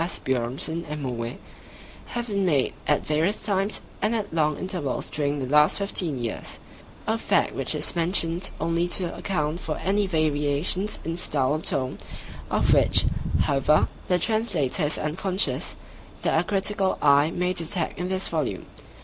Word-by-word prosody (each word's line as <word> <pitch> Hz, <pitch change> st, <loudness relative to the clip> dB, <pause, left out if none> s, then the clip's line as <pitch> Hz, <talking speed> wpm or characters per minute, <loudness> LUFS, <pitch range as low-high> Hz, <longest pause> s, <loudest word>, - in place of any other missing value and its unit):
Asbjörnsen 135 Hz, +1 st, -2 dB
and 150 Hz, -1 st, -4 dB
Moe, 120 Hz, -1 st, -4 dB, 0.8 s
have 240 Hz, 0 st, -1 dB
been 200 Hz, -4 st, -1 dB
made 150 Hz, -8 st, +2 dB
at 150 Hz, -, +2 dB
various 160 Hz, +7 st, +1 dB
times 200 Hz, 0 st, 0 dB, 0.2 s
and 230 Hz, -, +1 dB
at 210 Hz, -6 st, -3 dB
long 155 Hz, -2 st, +1 dB
intervals 180 Hz, -8 st, -3 dB
during 145 Hz, -1 st, -1 dB
the 135 Hz, -, -3 dB
last 150 Hz, +3 st, +4 dB
fifteen 185 Hz, -7 st, 0 dB
years; 120 Hz, -2 st, -5 dB, 0.5 s
a -, -, 0 dB
fact -, -, +1 dB
which -, -, +1 dB
is -, -, +2 dB
mentioned 170 Hz, +1 st, +2 dB
only 165 Hz, +1 st, 0 dB
to 175 Hz, 0 st, -1 dB
account 155 Hz, -4 st, -2 dB
for 155 Hz, -4 st, -4 dB
any 200 Hz, +1 st, 0 dB
variations 155 Hz, +3 st, +1 dB
in 165 Hz, +1 st, -2 dB
style 145 Hz, -6 st, 0 dB
or 155 Hz, -, -1 dB
tone—of 130 Hz, -5 st, -2 dB
which, -, -, +5 dB, 0.4 s
however, 140 Hz, +2 st, +3 dB, 0.2 s
the 180 Hz, -, +3 dB
Translator 185 Hz, -, +1 dB
is 150 Hz, -, 0 dB
unconscious—that 185 Hz, +6 st, -1 dB
a -, -, +1 dB
critical 195 Hz, -1 st, +1 dB
eye 145 Hz, +1 st, +5 dB
may 180 Hz, +2 st, -1 dB
detect 170 Hz, -1 st, 0 dB
in 180 Hz, +1 st, -2 dB
this 190 Hz, 0 st, 0 dB
volume. 155 Hz, -5 st, -2 dB
165 Hz, 150 wpm, -25 LUFS, 145-190 Hz, 0.8 s, which